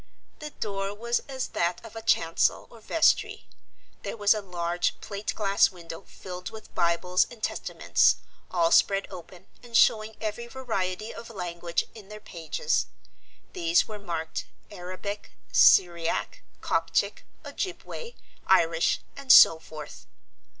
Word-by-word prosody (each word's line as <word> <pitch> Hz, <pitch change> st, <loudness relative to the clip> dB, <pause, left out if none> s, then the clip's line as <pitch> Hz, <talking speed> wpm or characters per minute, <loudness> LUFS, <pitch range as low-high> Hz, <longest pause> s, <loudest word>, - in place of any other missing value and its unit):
The 300 Hz, -, -6 dB
door 200 Hz, -6 st, -4 dB
was 235 Hz, +3 st, 0 dB
as 260 Hz, -1 st, -3 dB
that 170 Hz, +1 st, -1 dB
of 225 Hz, -, -12 dB
a 225 Hz, -, -6 dB
chancel 165 Hz, -6 st, +1 dB
or 230 Hz, -, -15 dB
vestry; 325 Hz, +9 st, +1 dB, 0.5 s
there -, -, -5 dB
was 205 Hz, 0 st, +5 dB
a 215 Hz, -, -3 dB
large 175 Hz, -2 st, -2 dB
plate 200 Hz, 0 st, -5 dB
glass 200 Hz, -2 st, +3 dB
window 170 Hz, -2 st, -10 dB
filled 180 Hz, -1 st, -8 dB
with 220 Hz, -1 st, -12 dB
Bibles 170 Hz, +2 st, +2 dB
and 230 Hz, -3 st, -14 dB
Testaments, -, -, +2 dB, 0.3 s
all 170 Hz, -2 st, +2 dB
spread 195 Hz, 0 st, +4 dB
open 180 Hz, 0 st, -11 dB, 0.2 s
and 235 Hz, -2 st, -1 dB
showing 220 Hz, -1 st, +3 dB
every 220 Hz, +2 st, -4 dB
variety 220 Hz, -5 st, -3 dB
of 235 Hz, -, -10 dB
language 175 Hz, -4 st, -3 dB
in 210 Hz, -3 st, -13 dB
their 210 Hz, 0 st, -9 dB
pages. 190 Hz, -, -2 dB, 0.7 s
These 340 Hz, -2 st, +2 dB
were 215 Hz, -1 st, -7 dB
marked, 165 Hz, -4 st, -4 dB, 0.3 s
Arabic, 185 Hz, +3 st, -7 dB, 0.2 s
Syriac, 170 Hz, -3 st, +4 dB, 0.2 s
Coptic, -, -, 0 dB, 0.2 s
Ojibway, 465 Hz, +5 st, -6 dB, 0.3 s
Irish 165 Hz, -3 st, +3 dB
and 275 Hz, -2 st, 0 dB
so 160 Hz, -, +9 dB
forth. 155 Hz, -2 st, -10 dB
195 Hz, 130 wpm, -27 LUFS, 175-225 Hz, 0.7 s, so